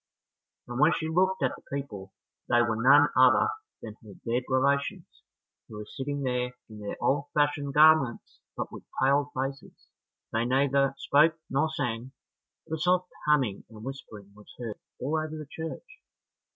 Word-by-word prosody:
And 120 +1 -5
when 150 +4 +5
she 160 - -2
looked 185 +1 +1
at 130 - +2
the - - -16
people, 105 -9 -6 0.4
they 120 - +4
were 115 -2 0
none 140 +3 +6
other 130 - +5 0.3
than 110 -2 -8
her 105 -3 -13
dead 120 +2 -1
relations 140 +2 +1 0.6
who 110 - -11
were 105 - -7
sitting 140 +4 -4
there 125 -1 -1
in 110 -1 -11
their 105 -1 -5
old 140 +1 +1
fashioned 145 -1 +1
garments, 150 -5 +4 0.2
but - - -4
with - - -9 0.2
pale 140 +2 +2
faces. 135 +1 -5 0.4
They 115 +1 +1
neither 135 +1 +2
spoke 155 +4 +3
nor 140 +4 +2
sang; 125 -3 -4 0.5
but 160 0 -4
a - - -12
soft 180 +1 +1 0.2
humming 130 -10 +2
and 110 -1 -12
whispering 105 -6 -9
was 105 0 -16
heard 115 -4 -6 0.2
all 145 +5 -1
over 155 0 -5
the 155 - -7
church. 160 - -7
135 Hz, 165 wpm, -28 LUFS, 120-150 Hz, 0.6 s, none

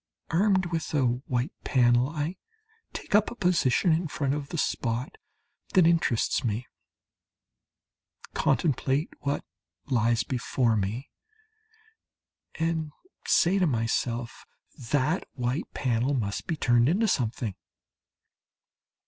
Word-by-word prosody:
Armed 190 +2 +3
with 165 -1 -2
a 140 -3 +3 0.2
white 125 +5 -1
panel 120 0 +3
I 155 +3 -3 0.5
take - - -7
up 210 +1 +4
a - - -8
position 175 - +2
in 165 +2 0
front 140 -2 -1
of 145 -1 -4
the 170 - -4
spot 120 -4 -1 0.6
that 185 -3 +6
interests 165 -9 +2
me, 115 +1 -2 1.7
contemplate 145 -1 +1
what 140 +1 -2 0.4
lies 120 -4 +2
before 125 -2 0
me, 105 +6 -3 1.4
and 160 -2 -1 0.4
say 190 +4 +4
to 180 - +3
myself 115 -1 -2 0.4
"That 150 +5 +1
white 125 +4 -2
panel 125 +2 0
must 100 -5 -3
be 165 - -2
turned 120 -2 +3
into 210 +7 +2
something." 115 - -1
135 Hz, 110 wpm, -27 LUFS, 120-165 Hz, 1.7 s, that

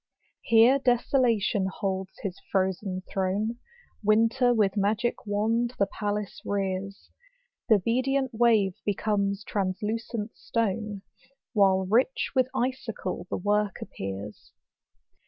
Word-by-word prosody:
Here 230 +4 +5
Desolation 240 -6 +2
holds 190 -1 -3
his 190 -2 -4
frozen 190 0 0
throne; 200 +5 -1 0.4
Winter 230 +4 +3
with 215 -4 +2
magic 210 +3 0
wand 225 +4 0
the 200 - +3
palace 205 0 -4
rears; 195 0 -3 0.6
Th' - - +7
obedient 255 +6 +1
wave 220 -5 +3
becomes 200 0 0
translucent 210 +3 -3
stone, 210 -2 -2 0.5
While 190 -3 +4
iicli 230 +7 +4 0.3
witn 255 -1 +4
icicle 230 -8 -3
the - - -2
work 205 0 +1
appears. 100 +2 -7
210 Hz, 100 wpm, -27 LUFS, 195-230 Hz, 0.6 s, Th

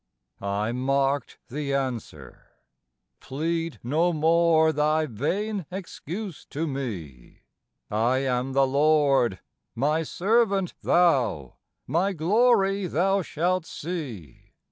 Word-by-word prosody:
I 100 +2 -1
marked 135 +1 0
the 140 +1 -3
answer: 130 -5 -5 0.7
"Plead 165 +4 -3
no 160 +8 +2
more 160 0 +3
thy 155 +1 +2
vain 180 - -2
excuse 190 0 -7
to 155 +3 -3
me; 100 - -6 0.5
I 115 +5 +2
am 130 +1 -1
the 135 0 +4
Lord; 140 - +2 0.3
my 150 +6 +1
servant 195 +2 +1
thou; 130 - +2 0.3
my 175 +8 0
glory 195 +2 +2
thou 195 +5 +1
shalt 175 +1 -1
see. 135 - -7
150 Hz, 100 wpm, -25 LUFS, 130-175 Hz, 0.7 s, the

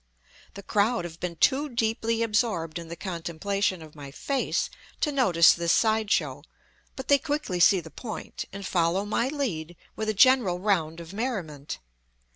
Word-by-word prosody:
The 200 - -8
crowd 210 -1 +1
have 170 -1 -9
been 180 -1 -4
too 285 - +2
deeply 225 -1 0
absorbed 210 -8 0
in 170 - -9
the 170 - -6
contemplation 185 +1 -2
of 155 -1 -13
my 145 -2 -9
face 270 - -1 0.3
to 300 - +1
notice 185 - +5
this 170 -1 0
side 220 0 +2
show; - - 0 0.5
but 265 - -7
they 285 -1 +5
quickly 290 - -2
see 180 +2 +6
the 160 -1 -12
point, 220 - -6
and 195 0 -7
follow 175 +3 +1
my 220 +4 0
lead 190 - -3 0.2
with 220 0 -2
a 215 - 0
general 245 -6 +5
round 175 -5 0
of 170 +2 -10
merriment. 185 - -4
200 Hz, 165 wpm, -27 LUFS, 170-230 Hz, 0.5 s, see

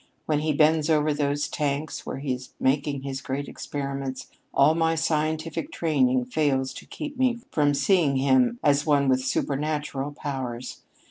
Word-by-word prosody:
When 150 -2 +1
he 155 +1 0
bends 155 +1 +3
over 155 -1 +3
those 145 0 0
tanks 145 +1 -3
where - - -4
he 135 -1 -2
is 125 0 -9
making 140 0 0
his 135 -1 -4
great 140 0 -3
experiments, 140 -2 -5 0.2
all 140 +3 +5
of 160 - -1
my 165 0 +2
scientific 160 - -1
training 130 - +2
fails 130 -1 0
to - - -11
keep 290 -3 -7
me 250 -2 +2
from 145 -2 +2
seeing 165 -4 +3
him 240 - +3
as 145 0 +4
one 145 -3 +3
with 130 0 +3
supernatural 145 +1 -1
powers. 130 -4 -5
145 Hz, 160 wpm, -25 LUFS, 135-155 Hz, 0.2 s, all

